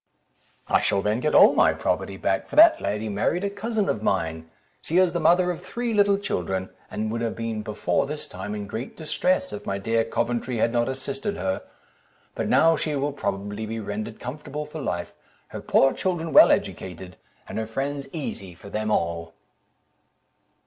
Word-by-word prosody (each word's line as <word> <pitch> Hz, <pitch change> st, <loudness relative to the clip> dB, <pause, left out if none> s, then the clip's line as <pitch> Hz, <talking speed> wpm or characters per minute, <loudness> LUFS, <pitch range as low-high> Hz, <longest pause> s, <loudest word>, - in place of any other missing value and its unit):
"I -, -, +3 dB
shall 100 Hz, -1 st, +1 dB
then 105 Hz, +3 st, +1 dB
get 150 Hz, +4 st, 0 dB
all -, -, +8 dB
my -, -, +4 dB
property 95 Hz, -, -2 dB
back, 95 Hz, 0 st, -1 dB
for -, -, -8 dB
that 325 Hz, +2 st, +8 dB
lady 105 Hz, +2 st, -2 dB
married 110 Hz, -, 0 dB
a 200 Hz, -, -1 dB
cousin 215 Hz, 0 st, -1 dB
of -, -, -1 dB
mine; 80 Hz, -5 st, -1 dB, 0.3 s
she 165 Hz, -, -1 dB
is 185 Hz, -2 st, +4 dB
the 175 Hz, -, 0 dB
mother 180 Hz, +1 st, +4 dB
of 175 Hz, -, -6 dB
three 235 Hz, +5 st, -3 dB
little 200 Hz, -1 st, +4 dB
children, 95 Hz, -, -3 dB, 0.2 s
and 110 Hz, 0 st, -3 dB
would 115 Hz, +1 st, -2 dB
have 115 Hz, -1 st, -2 dB
been 115 Hz, -1 st, -3 dB
before 105 Hz, +1 st, -1 dB
this 150 Hz, +1 st, -4 dB
time 95 Hz, +3 st, -6 dB
in 105 Hz, -1 st, -5 dB
great 110 Hz, +5 st, -6 dB
distress, 165 Hz, -, 0 dB
if 105 Hz, 0 st, -7 dB
my 100 Hz, -, -1 dB
dear 115 Hz, +3 st, +1 dB
Coventry 120 Hz, +2 st, -2 dB
had 115 Hz, -, +2 dB
not 120 Hz, +1 st, +1 dB
assisted 140 Hz, +11 st, -4 dB
her; 95 Hz, 0 st, -1 dB, 0.7 s
but -, -, -2 dB
now 165 Hz, +1 st, +5 dB
she 150 Hz, 0 st, -1 dB
will 140 Hz, +1 st, -1 dB
probably 105 Hz, -2 st, -3 dB
be 115 Hz, +1 st, -4 dB
rendered 105 Hz, +1 st, -5 dB
comfortable 150 Hz, +3 st, -6 dB
for 150 Hz, +1 st, -7 dB
life, 85 Hz, -9 st, -3 dB, 0.4 s
her -, -, -7 dB
poor 135 Hz, -, +4 dB
children 170 Hz, -3 st, -2 dB
well -, -, +9 dB
educated, 90 Hz, 0 st, -2 dB, 0.3 s
and -, -, -4 dB
her 110 Hz, -, -3 dB
friends 140 Hz, +4 st, -3 dB
easy 100 Hz, -, -6 dB
for 100 Hz, +4 st, -12 dB
them 110 Hz, 0 st, -2 dB
all." 85 Hz, -4 st, -1 dB
115 Hz, 185 wpm, -25 LUFS, 100-160 Hz, 0.7 s, well